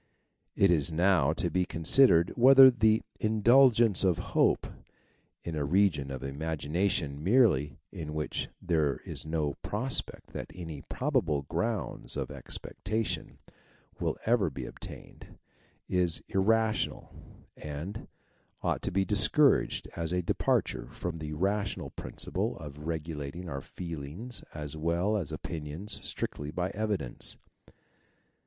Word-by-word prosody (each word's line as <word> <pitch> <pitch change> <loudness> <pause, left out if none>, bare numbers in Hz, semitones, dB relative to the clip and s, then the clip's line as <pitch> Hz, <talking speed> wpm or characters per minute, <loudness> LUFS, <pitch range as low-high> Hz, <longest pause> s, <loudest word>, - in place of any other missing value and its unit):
It 100 -2 +4
is 80 -2 +2
now 85 -3 +3
to 85 +1 -2
be 90 - +2
considered 85 - +5
whether 135 +2 +9
the 110 -2 +3 0.2
indulgence 115 -1 +4
of 90 -3 +3 0.2
hope, - - +3 0.8
in 85 - -4
a 75 - -1
region 80 -3 +2
of 65 -1 -6
imagination 75 +1 -1
merely, 90 - +3
in 75 -2 -6
which 75 -1 -2
there 75 -6 +1
is 70 +3 -5
no 80 -3 -1
prospect 125 +5 -3
that - - -6
any 80 -5 -7
probable 110 - 0
grounds 90 +9 -3
of - - -3
expectation 110 +2 -3 0.6
will - - -1
ever 110 -6 +3
be 70 - -6
obtained, - - -10 0.5
is 90 -3 +1
irrational, 110 +3 +1 0.4
and 75 +8 -6 0.6
ought - - 0
to - - -2
be 95 +1 +1
discouraged 120 +9 +3
as 85 -1 -2
a 90 0 0
departure - - 0
from 85 -2 -5
the 75 -1 -5
rational 100 +4 -1
principle - - -4
of 75 +1 -9
regulating 80 +1 -4
our 70 -4 -4
feelings 85 - -7
as 75 -1 -5
well 85 +6 0
as 95 -9 -2
opinions 80 +7 -5
strictly 75 0 -3
by 90 +4 -2
evidence. 100 - -3
85 Hz, 120 wpm, -30 LUFS, 75-105 Hz, 0.8 s, whether